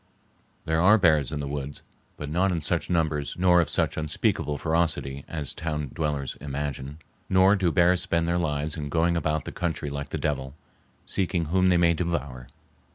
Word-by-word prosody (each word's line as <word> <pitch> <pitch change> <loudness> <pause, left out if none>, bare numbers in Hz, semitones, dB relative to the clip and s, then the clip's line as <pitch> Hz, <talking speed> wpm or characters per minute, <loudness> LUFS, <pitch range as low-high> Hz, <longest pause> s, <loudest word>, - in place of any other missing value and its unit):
There 80 +1 +1
are 105 +5 +6
bears 80 - +3
in 75 -2 -3
the 70 - -4
woods, 70 0 -5 0.3
but 75 - -6
not 90 +6 +1
in 85 -2 -1
such - - -1
numbers 80 -4 0
nor 90 -1 +5
of 80 - -2
such - - 0
unspeakable 75 -1 -1
ferocity 80 -4 -1
as 75 -5 -3
town 75 -4 -4
dwellers 75 -4 -2
imagine, 70 0 -4 0.3
nor 95 +2 +5
do 95 -4 +1
bears 90 +2 +4
spend 85 -1 0
their 85 +1 +1
lives 75 -2 -2
in 75 -3 -5
going 85 +3 +2
about 80 -2 -1
the - - -5
country 80 -4 -3
like 70 0 -5
the - - -3
devil, 65 -2 -3 0.5
seeking 85 -3 0
whom 95 +3 +2
they 90 - +4
may 85 -1 +4
devour. 70 -7 -3
80 Hz, 180 wpm, -26 LUFS, 70-85 Hz, 0.5 s, are